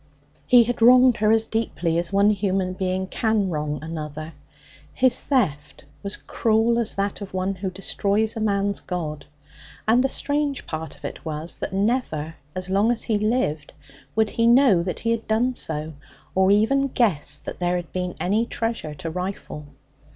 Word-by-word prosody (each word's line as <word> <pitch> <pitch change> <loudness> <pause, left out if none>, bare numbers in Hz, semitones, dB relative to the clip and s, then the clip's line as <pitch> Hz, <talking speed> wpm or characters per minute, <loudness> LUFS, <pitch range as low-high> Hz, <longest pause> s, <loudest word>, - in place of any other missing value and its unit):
He 245 -1 +7
had 240 0 -3
wronged 250 +1 +7
her 215 0 +2
as 225 0 +3
deeply 180 -8 -1
as 170 +1 -3
one 200 +1 +4
human 190 -2 0
being 185 0 -1
can 210 -1 0
wrong 150 -1 -2
another. 155 0 -6 0.6
His 255 -1 +3
theft 155 - -1 0.2
was 200 0 -4
cruel 225 +1 +1
as 230 -2 0
that 200 +1 -2
of 195 -1 -7
one 185 +1 0
who 190 0 -4
destroys 200 +3 -1
a - - -3
man's 200 -2 0
God. 155 -5 -5 0.6
And 240 +3 +4
the 270 - +1
strange 285 0 -2
part 160 0 -5
of - - -12
it - - -6
was 155 +1 -4
that - - -4
never, 195 - -1 0.2
as 185 0 -4
long 200 +5 +2
as 240 - -2
he 215 -3 0
lived, 215 - -1 0.4
would 220 -1 +2
he 230 0 +2
know 240 -7 +6
that 180 +1 -4
he 230 - 0
had 230 -1 -2
done 235 +4 +1
so, 155 -7 -4 0.4
or 190 0 +3
even 225 +7 +3
guess 165 - 0
that - - -8
there 175 0 +1
had 175 -2 -4
been 180 -1 -3
any 215 +5 +1
treasure 225 -12 -3
to 165 - -5
rifle. 180 -4 -5
200 Hz, 175 wpm, -23 LUFS, 175-230 Hz, 0.6 s, He